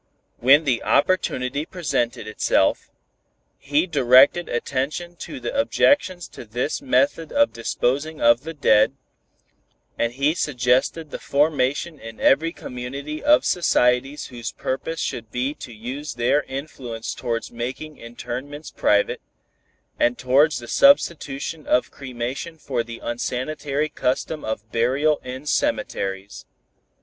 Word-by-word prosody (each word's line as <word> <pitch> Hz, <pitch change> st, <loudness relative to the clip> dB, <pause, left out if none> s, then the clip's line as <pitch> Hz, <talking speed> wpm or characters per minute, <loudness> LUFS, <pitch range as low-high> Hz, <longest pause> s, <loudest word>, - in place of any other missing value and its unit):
When 135 Hz, +6 st, +6 dB
the 130 Hz, -6 st, +1 dB
opportunity 140 Hz, -4 st, +1 dB
presented 145 Hz, -, -2 dB
itself, 110 Hz, -, +1 dB, 0.7 s
he 145 Hz, +4 st, +1 dB
directed 140 Hz, +1 st, +5 dB
attention 140 Hz, +8 st, -2 dB
to 285 Hz, -, -7 dB
the -, -, -4 dB
objections 185 Hz, -, +2 dB
to -, -, -10 dB
this 120 Hz, -, -3 dB
method 265 Hz, -, +1 dB
of 285 Hz, 0 st, +3 dB
disposing 140 Hz, +7 st, -1 dB
of 120 Hz, +1 st, +5 dB
the 165 Hz, +3 st, -7 dB
dead, 110 Hz, -5 st, +4 dB, 1.1 s
and 120 Hz, 0 st, 0 dB
he 140 Hz, +4 st, +1 dB
suggested 140 Hz, +1 st, 0 dB
the -, -, -5 dB
formation 145 Hz, +1 st, 0 dB
in 115 Hz, 0 st, -10 dB
every 160 Hz, +5 st, +3 dB
community 140 Hz, +2 st, -6 dB
of 300 Hz, +1 st, +5 dB
societies 135 Hz, -4 st, +2 dB
whose 120 Hz, -3 st, -6 dB
purpose 160 Hz, +5 st, -4 dB
should 115 Hz, -7 st, -4 dB
be 125 Hz, +5 st, -2 dB
to 125 Hz, -, -10 dB
use 125 Hz, +6 st, -6 dB
their 120 Hz, +5 st, +2 dB
influence 130 Hz, -5 st, -6 dB
towards 115 Hz, -1 st, -3 dB
making 130 Hz, +6 st, -6 dB
interments 130 Hz, +5 st, -7 dB
private, 105 Hz, 0 st, +1 dB, 0.8 s
and 120 Hz, +1 st, +2 dB
towards 135 Hz, +4 st, +3 dB
the 120 Hz, -, -8 dB
substitution 165 Hz, -, +2 dB
of 125 Hz, -, +2 dB
cremation 130 Hz, +5 st, -5 dB
for 135 Hz, -5 st, -2 dB
the 115 Hz, 0 st, -8 dB
unsanitary 135 Hz, +5 st, -2 dB
custom 150 Hz, +2 st, -2 dB
of 110 Hz, 0 st, -5 dB
burial 135 Hz, +6 st, +2 dB
in 130 Hz, +3 st, -7 dB
cemeteries. 100 Hz, -6 st, -2 dB
135 Hz, 120 wpm, -23 LUFS, 120-155 Hz, 1.1 s, When